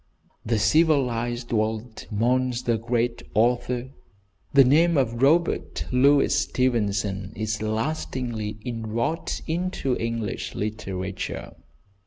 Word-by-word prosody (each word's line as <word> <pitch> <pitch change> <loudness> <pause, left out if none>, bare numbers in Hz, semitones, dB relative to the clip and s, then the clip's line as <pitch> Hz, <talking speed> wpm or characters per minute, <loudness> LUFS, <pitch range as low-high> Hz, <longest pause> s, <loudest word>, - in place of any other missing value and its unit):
The 115 0 0
civilised 120 -2 +2
world 110 +1 -2
mourns 125 +3 +1
the 115 -2 +1
great 120 +1 -1
author. 120 +3 +1 0.6
The 140 -1 +7
name 160 +5 +4
of 120 -3 0
Robert 165 +5 +2
Louis 140 +3 +4
Stevenson 105 -6 0
is 110 0 -2
lastingly 110 -2 -2
inwrought 115 +6 -2
into 165 -6 -1
English 115 -3 -3
literature. 95 -3 -4
120 Hz, 95 wpm, -25 LUFS, 110-130 Hz, 0.6 s, The